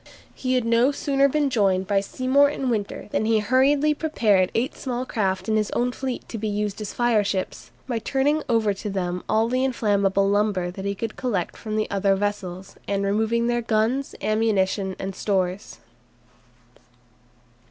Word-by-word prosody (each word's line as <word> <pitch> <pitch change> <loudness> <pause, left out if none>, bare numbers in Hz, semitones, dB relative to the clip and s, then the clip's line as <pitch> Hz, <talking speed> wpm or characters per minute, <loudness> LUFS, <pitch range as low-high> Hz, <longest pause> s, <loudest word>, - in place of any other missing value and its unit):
He 255 -1 -1
had 250 -2 +1
no 235 +4 +3
sooner 275 -1 +2
been 290 -1 +1
joined 195 -5 +2
by 200 0 +2
Seymour 260 +7 +2
and 270 -3 -2
Winter 210 -3 -3
than - - 0
he 225 0 +3
hurriedly 270 +7 +3
prepared 215 - +1
eight 250 +6 0
small 250 -1 -3
craft 190 -6 -1
in 220 0 +2
his 215 -1 0
own 245 +1 +1
fleet 260 0 -5
to 225 - -5
be 215 - -2
used 210 0 -2
as 210 - -4
fireships, 210 -6 0 0.2
by 240 -3 -1
turning 285 +6 +1
over 225 -3 +2
to 200 +2 -6
them 180 -2 -2
all 220 +1 +3
the 255 +2 0
inflammable 200 -6 +1
lumber 200 -3 +1
he 200 +1 -3
could 225 +3 -5
collect 205 -9 -2
from 215 -1 -5
the 215 0 0
other 195 0 +2
vessels, 195 -2 -4
and 200 0 0
removing 220 +3 +1
their 240 0 +1
guns, 230 +4 0
ammunition, 200 -3 +1
and 195 0 -5
stores. 190 -1 -2
215 Hz, 165 wpm, -24 LUFS, 195-250 Hz, 0.2 s, no